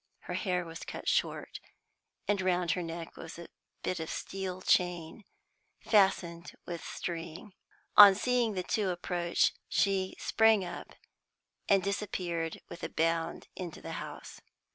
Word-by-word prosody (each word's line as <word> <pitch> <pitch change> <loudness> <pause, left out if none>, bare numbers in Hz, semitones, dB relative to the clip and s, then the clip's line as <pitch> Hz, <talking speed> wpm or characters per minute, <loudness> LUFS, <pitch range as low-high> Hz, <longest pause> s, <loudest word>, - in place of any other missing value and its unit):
Her - - -6
hair 180 -3 0
was 165 0 -8
cut - - -7
short, - - 0 0.7
and 205 -1 +2
round 180 -2 +1
her 180 - 0
neck 165 0 -6
was 165 - -9
a 170 - -9 0.3
bit 185 - -1
of 160 - -4
steel 185 -1 -4
chain, 180 +3 +1 0.5
fastened 190 -5 +2
with 170 -2 -5
string. 170 +3 -6 0.4
On 200 -2 +12
seeing 240 0 +1
the 185 - -1
two 205 0 0
approach, 175 -1 +1 0.2
she 190 -1 +1
sprang 220 -3 +4
up, 175 0 -8 0.7
and 195 -2 +5
disappeared 180 -5 -2
with 170 - -9
a - - -2
bound 165 0 0
into 175 -4 -6
the - - -7
house. - - -9
180 Hz, 140 wpm, -31 LUFS, 170-195 Hz, 0.7 s, On